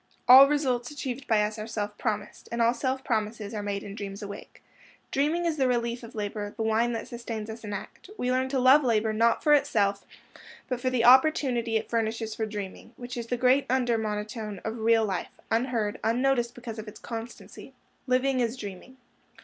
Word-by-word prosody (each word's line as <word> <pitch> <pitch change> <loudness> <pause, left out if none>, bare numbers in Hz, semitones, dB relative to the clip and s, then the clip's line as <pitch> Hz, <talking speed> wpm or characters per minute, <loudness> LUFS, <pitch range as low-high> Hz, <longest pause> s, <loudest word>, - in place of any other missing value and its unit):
All 265 +2 +10
results 260 -5 0
achieved 275 -2 -5
by 215 -3 +3
us 215 +1 -3
are 215 - -5
self 210 -2 -4
promised, 210 -2 -4
and 235 - -3
all 230 +1 +4
self 260 +2 -2
promises 215 -1 -2
are 210 - -3
made 200 -1 -3
in 200 - -8
dreams 200 0 -7
awake. 200 0 -10 0.5
Dreaming 310 +5 +1
is 325 -2 0
the 265 -2 +2
relief 235 -1 -1
of 230 0 -11
labor, 205 0 -4
the 225 - -1
wine 225 +2 +1
that 230 - -4
sustains 230 -2 -6
us 225 +1 -10
in 210 - -6
act. 205 - -8
We 250 -6 -1
learn 260 +1 +1
to 270 - -1
love 260 +4 +6
labor, 220 -3 +1
not 230 +2 +2
for 300 - +5
itself, 210 -9 +2 0.6
but 250 -2 -3
for 255 - +1
the 250 -2 +1
opportunity 250 -3 +4
it - - -4
furnishes 225 -1 -1
for 220 0 -3
dreaming, 205 +2 -7
which 245 +1 -7
is 235 -1 -5
the 245 - -1
great 255 +3 +3
under 245 -2 +2
monotone 210 -1 -4
of 225 +1 -4
real 225 0 +3
life, 190 -3 -3 0.2
unheard, 225 -3 0
unnoticed, 240 +1 +1
because 235 -2 -7
of 215 - -8
its 210 - -10
constancy. 230 +2 -9 0.3
Living 255 +1 +2
is 235 +1 0
dreaming. 210 +4 -9
230 Hz, 200 wpm, -27 LUFS, 215-255 Hz, 0.6 s, All